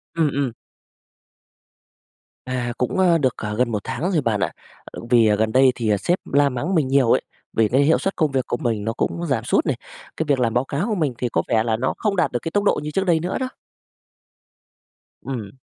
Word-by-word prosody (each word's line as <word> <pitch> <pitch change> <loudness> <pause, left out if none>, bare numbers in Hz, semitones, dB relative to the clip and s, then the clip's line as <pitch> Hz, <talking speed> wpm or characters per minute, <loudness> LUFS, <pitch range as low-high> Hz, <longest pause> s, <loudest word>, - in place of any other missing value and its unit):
Ừm, 165 -2 +2
ừm. 140 -3 0 2.0
À, 125 -1 -2
cũng, 125 - -1
ờ, 175 -3 +5
được 130 -6 0 0.2
gần 125 -1 +1
1 105 - 0
tháng 170 +10 -2
rồi 165 -5 +2
bạn 115 -5 0
ạ. - - 0 0.3
Ờ, - - -10
vì 115 -3 +5
gần 110 +1 0
đây 130 +2 +5
thì 115 -3 0
sếp 175 - +1 0.2
la 140 0 +4
mắng 135 +9 -2
mình 150 -5 +2
nhiều 135 -3 +3
ấy, - - +4 0.3
vì 110 -1 +3
cái 130 +6 +2
hiệu 155 +3 +4
suất 195 - -2
công 155 -4 +1
việc 130 -2 -1
của - - -1
mình 115 -4 -1
nó 115 - -1
cũng 170 +8 -2
giảm 135 - 0
sút - - +1
này, - - 0 0.4
cái - - 0
việc 140 -3 +2
làm 115 -2 +1
báo 120 - +2
cáo 150 - -2
của 215 - 0
mình 155 -8 0
thì 125 - -2
có - - +1
vẻ 110 -2 +2
là 115 -1 0
nó 130 +3 -1
không 210 -2 0
đạt - - +1
được 120 - -1
cái 165 - -4
tốc 205 +2 +1
độ 205 - +2
như 150 - -4
trước 195 +5 0
đây 170 -3 +3
nữa 175 +3 -2
đó. 260 -1 -2 1.7
Ừm. 115 -7 -5
135 Hz, 230 wpm, -22 LUFS, 120-165 Hz, 2.0 s, ờ